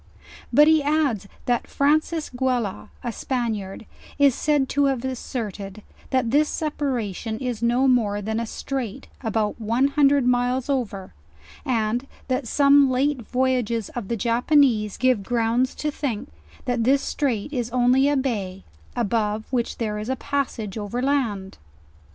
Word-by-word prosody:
But 295 +1 +6
he 315 -1 +5
adds 285 -9 0 0.2
that 245 -2 0
Francis 310 +3 +1
Guella, 245 -5 -1
a 240 - -2
Spaniard, 225 -5 -3 0.3
is 280 -2 +5
said 290 0 +1
to 285 0 +2
have 265 -2 0
asserted, 215 -6 -5 0.3
that 255 -4 +1
this 295 +2 +3
separation 245 - -2
is 245 -2 -4
no 240 +3 +3
more 220 -5 +2
than 220 +2 -2
a 230 - -3
straight, 260 0 -5
about 220 -2 -1
one 235 +6 +2
hundred 280 -2 +3
miles 250 +2 +1
over, 200 -8 -3 0.5
and 240 -1 0 0.2
that 255 -1 -1
some 280 +1 +5
]ate 275 0 +1
voyages 245 -3 0
of 235 -5 -6
the 235 - -2
Japanese 235 -1 +2
give 255 -5 +2
grounds 235 +4 0
to 300 - -2
think, 260 -7 -4 0.3
that 245 -2 0
this 275 +3 +3
straight 275 -2 -2
is 240 -3 -2
only 250 +3 +3
a 290 - +2
bay, 200 -8 -2 0.3
above, 220 -2 0
which 240 -3 -1
there 210 -2 -2
is 215 +3 -5
a 260 - +1
passage 240 -7 -3
over 210 +4 -3
land. 230 -9 -1
245 Hz, 145 wpm, -23 LUFS, 220-275 Hz, 0.5 s, But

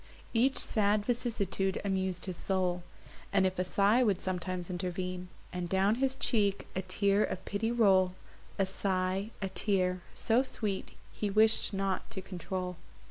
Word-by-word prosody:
Even 255 +4 +3
sad 205 -1 +3
vicissitude 210 -6 0
amus'd 190 -2 -1
his 185 -2 -4
soul; 180 -1 -1 0.5
And 195 -1 +3
if 185 -1 -1
a - - +2
sigh 200 +6 +3
would 205 -7 +2
sometimes 185 -1 -3
intervene, 180 0 -4 0.3
And 180 -1 -3
down 195 +3 +3
his 265 -1 +2
cheek 205 -7 +1
a 190 - 0
tear 200 +2 +1
of - - -4
pity 220 +3 -1
roll, 190 -6 +3 0.4
A 195 - +2
sigh, 190 +1 -1
a 195 - -1
tear, 185 -3 0
so 230 +3 +2
sweet, 215 -7 -3 0.2
he 210 - -3
wish'd 220 +2 +4
not 195 -1 -2
to 225 -4 -4
control. 180 -1 -5
195 Hz, 150 wpm, -31 LUFS, 185-210 Hz, 0.5 s, wish'd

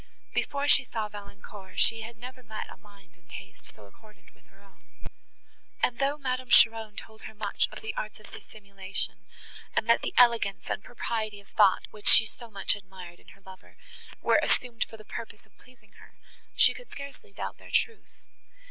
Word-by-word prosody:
Before 285 -8 0
she 280 - +7
saw 220 -3 -3
Valancourt 200 -2 -11
she 225 0 +4
had 225 +1 -8
never 255 +2 -9
met 215 -2 -7
a - - -11
mind 200 -3 -19
and 185 +1 -30
taste 195 - -10
so 105 - -14
accordant 210 - -20
with - - -28
her 195 - -24
own, 195 - -23 1.0
and, 245 -1 +2
though 280 +2 +2
Madame 255 -2 -2
Cheron 225 -3 +6
told 220 0 -10
her 220 - -9
much 205 -1 0
of - - -9
the 220 - -3
arts 215 0 -4
of 210 - -15
dissimulation, 195 -2 -6 0.5
and 220 - +1
that 235 - +5
the - - -4
elegance 235 -5 +5
and - - -2
propriety 220 -3 -3
of 200 - -19
thought, 200 -3 +4
which 210 -1 -5
she 220 - +8
so 235 +2 -10
much 200 -2 0
admired 190 -3 -11
in - - -24
her - - -25
lover, 190 -1 -14 0.5
were - - +5
assumed 240 -3 0
for 225 - -12
the 215 - -14
purpose 220 -2 -8
of 215 - -31
pleasing 235 -5 -21
her, - - -17 0.4
she - - +6
could - - -12
scarcely 280 0 -9
doubt - - -5
their - - -13
truth. 455 -1 -1
215 Hz, 190 wpm, -29 LUFS, 200-235 Hz, 1.0 s, she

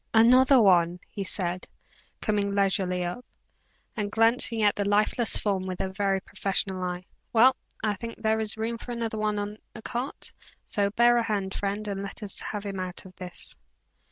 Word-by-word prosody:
"Another 255 +4 +7
one!" 180 -4 +4
he 200 - -4
said, 180 -2 -2 0.5
coming 205 -2 0
leisurely 190 -2 +1
up, 180 +8 -5 0.7
and 205 -2 -2
glancing 225 0 +3
at 205 -1 +4
the 205 - 0
lifeless 210 +3 +2
form 195 -3 -1
with 185 -1 -4
a 190 - -1
very 195 0 0
professional 190 -1 0
eye. 180 0 -3 0.3
"Well, 250 +3 +6 0.3
I 215 -1 +2
think 230 +3 -6
there 220 0 +1
is 220 0 -1
room 230 +1 -2
for 245 - -6
another 230 -2 -3
one 210 -1 0
in 205 +1 -4 0.2
the 220 - -9
cart; 250 +4 -3 0.3
so 200 -1 0
bear 240 +3 +4
a 235 - +2
hand, 200 -3 -2
friend, 205 +1 -3
and 195 -1 -3
let 200 +2 -6
us 200 - -4
have 210 -1 -4
him 195 -2 -4
out 185 0 -4
of 185 0 -13
this." 180 -2 -6
205 Hz, 185 wpm, -27 LUFS, 190-225 Hz, 0.7 s, Another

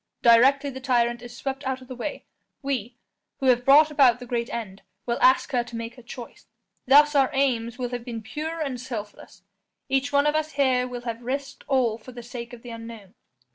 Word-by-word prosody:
Directly 270 +4 +5
the 265 0 -8
tyrant 240 -2 +1
is 240 0 -10
swept 270 0 -4
out 265 -1 -2
of 255 - -14
the 255 - -7
way, 255 +5 -5 0.4
we, 250 -4 -3 0.4
who 270 - -4
have 250 -1 +4
brought 295 +4 +6
about 265 -5 +5
the 250 - -8
great 235 -1 -2
end, 200 -5 -6 0.2
will 235 -1 -2
ask 260 - +4
her 245 -3 +1
to 235 0 -10
make 230 0 -5
her 250 - -14
choice. 240 0 -11 0.4
Thus 295 +3 +7
our 275 -2 +4
aims 245 -4 0
will 250 -2 -3
have 245 -1 -5
been 230 -2 -6
pure 315 +7 -5
and 265 -5 -3
selfless; 210 -6 -8 0.5
each 270 +1 +1
one 285 0 +3
of 295 - +3
us 310 0 -1
here 260 -3 +2
will 245 -1 -6
have 230 -1 -5
risked 270 +3 -4
all 250 -5 +1
for 255 +3 -12
the 240 -1 -9
sake 235 0 -8
of 245 0 -12
an 240 - -7
unknown. 230 -4 -10
250 Hz, 215 wpm, -25 LUFS, 235-275 Hz, 0.5 s, Thus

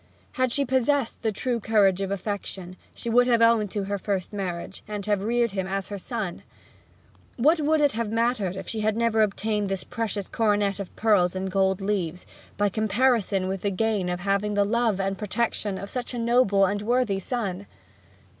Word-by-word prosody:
Had 255 -1 0
she 280 +2 +1
possessed 260 0 +1
the 220 - 0
true 240 +3 -1
courage 200 -3 +3
of 195 - -2
affection 195 -2 -4 0.2
she - - -8
would 245 +2 +4
have 235 -2 +4
owned 230 -2 +4
to 205 +1 -2
her 200 +1 -3
first 195 -1 -3
marriage, 190 -2 -4
and 210 -2 -5
have 205 -2 +1
reared 235 +2 +1
him 190 -1 -2
as 195 0 -3
her 200 -1 -5
son! 210 -3 -4 1.0
What 310 +7 +4
would 305 +1 +2
it 290 -1 +4
have 225 -1 -3
mattered 225 -5 0
if - - -7
she 225 - -3
had 215 0 +1
never 230 -1 +2
obtained 210 0 0
this 195 -1 -2
precious 215 -4 -3
coronet 205 -3 +1
of 200 - -7
pearls 195 -5 +3
and 190 0 -3
gold 190 0 +1
leaves, 185 -4 -2 0.3
by 205 - +3
comparison 215 -2 +1
with 190 -1 -3
the 200 - 0
gain 200 -2 0
of 180 0 -3
having 200 +2 0
the 205 0 +3
love 225 -2 +1
and 195 0 -1
protection 210 -2 -1
of 200 - -6
such 250 0 -4
a - - -3
noble 230 -4 +3
and 205 +2 -1
worthy 230 -3 +1
son? 200 -3 -3
205 Hz, 190 wpm, -25 LUFS, 195-230 Hz, 1.0 s, would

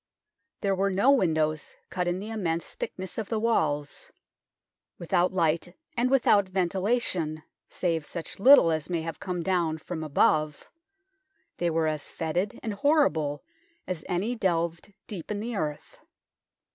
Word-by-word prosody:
There 200 -2 +1
were 195 +1 +1
no 200 +8 +4
windows 155 - +1 0.2
cut 180 -1 -1
in 175 +1 0
the 210 +4 -6
immense 170 -6 -2
thickness 230 - -5
of 215 - -4
the 225 - 0
walls; 150 -11 0 0.9
without 175 +1 +1
light 170 0 0 0.2
and 245 +1 +2
without 210 -7 +4
ventilation, 185 -4 0 0.3
save 165 -3 -1
such 170 0 -7
little 250 -7 +8
as 155 0 -2
may 170 -2 -1
have 165 0 -5
come 180 -2 -3
down 170 -4 +1
from 160 0 -6
above, 155 0 +2 0.9
they 175 - +1
were 165 0 +1
as 155 -2 -2
fetid 175 +5 -2
and 220 - -2
horrible 200 - +2 0.4
as 180 -4 -4
any 190 +7 0
delved 170 -3 -1
deep 185 -7 -7
in 210 -1 -2
the 230 +2 -4
earth. 150 -5 -4
180 Hz, 145 wpm, -27 LUFS, 160-200 Hz, 0.9 s, little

